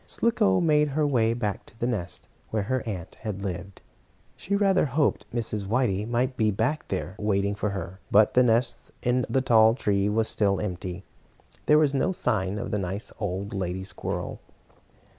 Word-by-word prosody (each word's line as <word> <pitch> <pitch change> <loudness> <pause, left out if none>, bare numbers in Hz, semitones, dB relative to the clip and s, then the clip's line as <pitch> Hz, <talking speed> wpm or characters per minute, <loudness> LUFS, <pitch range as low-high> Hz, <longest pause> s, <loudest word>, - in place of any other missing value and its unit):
Slicko 95 - +2
made 150 -2 +3
her 155 - +3
way 115 -5 +2
back 105 -4 -2
to - - -18
the - - 0
nest 105 -8 -3 0.2
where 110 -2 -1
her 130 +5 -1
aunt 95 -5 -5
had 100 -3 -5
lived. 95 0 -6 0.5
She 200 - -2
rather 195 -3 +3
hoped 140 +2 0
Mrs. 110 -4 -2
Whitey 110 -3 +1
might 125 +2 0
be 110 -3 +2
back 115 +9 -1
there, 95 -1 -3
waiting 100 -1 +1
for 105 +1 -2
her, 95 -1 -5
but 105 +1 +5
the 125 - +6
nest 120 0 +1
in 125 +1 +1
the 135 - +2
tall 115 -3 +5
tree 100 -4 +1
was 110 +1 +1
still 100 -2 +1
empty. 90 -2 -4 0.6
There 150 - +6
was 150 -2 +3
no 135 - +1
sign 100 - -1
of - - -4
the 105 - 0
nice 95 +3 -4
old 100 -1 -3
lady 95 -1 -3
squirrel. 100 - -4
110 Hz, 180 wpm, -26 LUFS, 100-125 Hz, 0.6 s, the